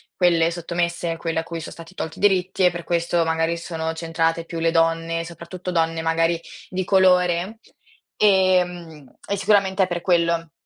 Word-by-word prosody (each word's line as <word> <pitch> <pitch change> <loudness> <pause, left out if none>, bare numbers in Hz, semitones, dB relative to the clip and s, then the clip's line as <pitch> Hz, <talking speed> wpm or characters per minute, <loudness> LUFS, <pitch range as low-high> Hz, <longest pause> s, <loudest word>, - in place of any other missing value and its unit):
quelle 170 -2 +3
sottomesse, 170 0 -2
quelle 165 -1 -2
a - - -3
cui 165 0 -6
so 160 - -8
stati 165 +2 -12
tolti 160 - -5
i - - -10
diritti 190 -2 +2
e 180 - +5
per 170 0 -6
questo, 170 0 +1
magari 165 +1 0
sono 165 -1 -4
centrate 165 0 -1
più 165 0 -6
le 165 0 +2
donne, 165 0 +1
soprattutto 170 +2 -7
donne 165 -1 0
magari 165 +1 +1 0.3
di 185 0 -3
colore, 185 +2 +3 0.6
ehm, 180 -7 +1
e 200 - -1
sicuramente 195 -1 +2
è 185 - 0
per 175 -1 -3
quello. 170 -2 +1
170 Hz, 170 wpm, -22 LUFS, 165-180 Hz, 0.6 s, e